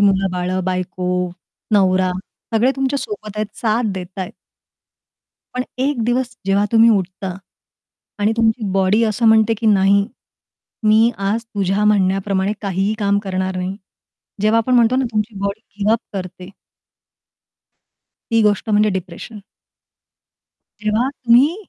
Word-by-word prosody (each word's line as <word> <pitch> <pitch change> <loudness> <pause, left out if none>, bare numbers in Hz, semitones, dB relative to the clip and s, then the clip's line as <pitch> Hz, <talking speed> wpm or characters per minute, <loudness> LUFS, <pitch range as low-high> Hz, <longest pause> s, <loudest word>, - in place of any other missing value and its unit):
मुलं-बाळं, 185 -2 +1
बायको, 185 -1 -3 0.7
नवरा 185 -2 +3 0.4
सगळे 240 +4 +4
तुमच्यासोबत 270 - -3
आहेत, 215 0 -1
साथ 220 -2 +1
देतायेत. 185 0 -6 1.2
पण 250 0 -1
एक 265 -2 0
दिवस 245 +1 -1
जेव्हा 195 +1 +3
तुम्ही 230 0 +6
उठता, 190 -2 -1 0.8
आणि 210 +2 +2
तुमची 225 0 +1
बॉडी 195 +3 +2
असं 225 +2 0
म्हणते, 220 0 +5
की 225 +1 -3
नाही, 200 -1 +4 0.8
मी 220 +2 +5
आज 205 +4 -1
तुझ्या 200 -2 -1
म्हणण्याप्रमाणे 195 -1 +1
काहीही 195 +2 0
काम 200 -1 +2
करणार 185 -1 -2
नाही. 185 +2 -3 0.7
जेव्हा 215 +2 +4
आपण 250 +3 +1
म्हणतो 240 +1 +4
ना 265 - +1
तुमची 215 0 -1
बॉडी 200 +2 -2 0.2
गिव्ह 210 +2 +2
अप 230 - +1 0.2
करते. 185 -1 -7 1.8
ती 230 -1 +3
गोष्ट 210 +1 +1
म्हणजे 210 0 +3
डिप्रेशन. 190 +4 -6 1.4
जेव्हा 215 +4 +1
तुम्ही 265 +3 +3
210 Hz, 120 wpm, -19 LUFS, 190-230 Hz, 1.8 s, तुम्ही